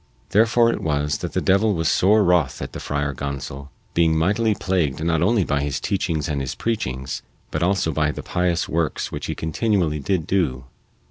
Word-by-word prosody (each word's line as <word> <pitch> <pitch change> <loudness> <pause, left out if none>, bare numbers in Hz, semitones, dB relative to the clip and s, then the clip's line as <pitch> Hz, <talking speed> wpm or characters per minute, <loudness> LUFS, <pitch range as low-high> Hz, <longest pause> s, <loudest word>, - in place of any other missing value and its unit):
Therefore 115 +3 +4
it - - -3
was 75 -2 0
that - - -5
the - - 0
devil 100 +2 +3
was 80 -1 0
sore 105 +3 +4
wroth 85 -8 +2
at - - -6
the - - -5
Friar 75 -1 -2
Gonsol, 70 0 -5 0.2
being 80 -1 +3
mightily 105 +6 +2
plagued 80 -8 -1
not 80 -1 +1
only 105 +3 +3
by 70 -3 0
his 70 -1 -2
teachings 85 -7 -1
and 70 -2 -1
his 65 - -4
preachings, 65 - -3 0.3
but 75 - -2
also 90 -2 +1
by 75 -1 +1
the - - -7
pious 90 -2 0
works 80 -1 -1
which - - -5
he - - -3
continually 80 -2 0
did 80 +3 -1
do. 65 -10 0
80 Hz, 190 wpm, -22 LUFS, 75-95 Hz, 0.3 s, Therefore